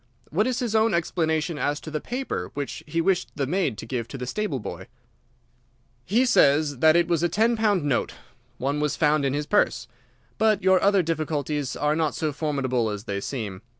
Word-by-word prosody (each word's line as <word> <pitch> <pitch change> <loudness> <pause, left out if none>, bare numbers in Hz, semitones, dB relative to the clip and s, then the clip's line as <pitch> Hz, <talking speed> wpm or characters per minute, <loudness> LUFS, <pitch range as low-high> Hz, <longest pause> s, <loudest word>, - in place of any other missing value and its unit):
What 205 - +2
is 255 -2 -1
his 240 -3 -2
own 220 -2 +3
explanation 160 -2 -1
as 145 +1 0
to 155 - -8
the 155 - -3
paper 255 +2 -4
which 140 -1 -5
he 165 +2 0
wished 190 +1 +1
the 140 - -1
maid 145 - -1
to - - -7
give 115 -1 -3
to 130 - -7
the 125 - -5
stable 155 0 -2
boy?" - - -7 1.2
"He 235 - +2
says 145 - +3
that 160 +2 +5
it 170 0 +3
was 170 -2 +1
a 175 - +2
ten 225 +6 +2
pound 210 -6 +1
note. 140 -4 -1 0.4
One 140 +3 -1
was 150 -1 0
found 150 -2 +2
in 135 0 0
his 150 0 -2
purse. 150 -10 +1 0.5
But 215 -2 +3
your 190 -1 +4
other 200 -2 +4
difficulties 150 -4 -2
are 150 +1 +1
not 160 -2 0
so 155 -2 -2
formidable 135 -6 -1
as 105 -1 -5
they 100 -2 -4
seem. 105 -6 -5
155 Hz, 200 wpm, -25 LUFS, 140-190 Hz, 1.2 s, that